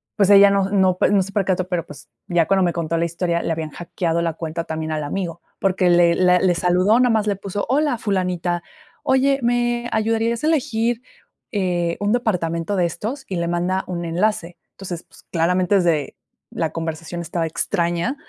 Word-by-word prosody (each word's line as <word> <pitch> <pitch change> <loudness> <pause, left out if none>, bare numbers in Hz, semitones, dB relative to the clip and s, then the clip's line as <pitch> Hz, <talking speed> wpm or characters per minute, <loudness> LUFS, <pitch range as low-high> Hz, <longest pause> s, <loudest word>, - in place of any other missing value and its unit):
pues 200 -2 +3
ella 200 0 +8
no 195 -1 +1
no 190 -2 +2
no 200 -1 +4
se 195 - -9
percató, 185 -2 0
pero, 180 -3 -2
pues 145 - -13 0.2
ya 175 -2 +2
cuando 190 0 +3
me 175 - +2
contó 165 -1 -2
la 165 - +1
historia 170 0 -1
le - - -2
habían 160 -1 -3
hackeado 170 0 -2
la 165 -1 -1
cuenta 165 +1 -4
también 160 -1 -4
al 155 -1 -2
amigo, 170 +2 -4 0.2
porque, 185 -1 +2
le 175 -1 +5
le 180 0 +4
le 180 -1 +2
saludó, 185 +7 +3
nomás 225 -4 +2
le 205 - +1
puso: 200 +1 -4
"Hola, 285 0 +1
fulanita, 180 -4 -1 0.4
oye, 270 +1 +2
¿me 240 0 0
ayudarías 225 +2 0
a - - +2
elegir, 240 -6 0 0.5
eh, 175 -5 -1
un 205 +1 +1
departamento 180 -6 -1
de 180 - +3
estos?", 220 - -4
y 190 - -4
le 170 -1 -1
manda 180 +2 0
un 175 -1 -4
enlace. 175 0 -1 0.2
Entonces, 180 -3 -7
pues, - - -20
claramente 180 +3 +1
es 185 - +2
de 160 -4 0 0.4
la - - -2
conversación 165 +1 -5
estaba 170 0 -2
extraña 170 - -1
180 Hz, 185 wpm, -21 LUFS, 170-205 Hz, 0.5 s, ella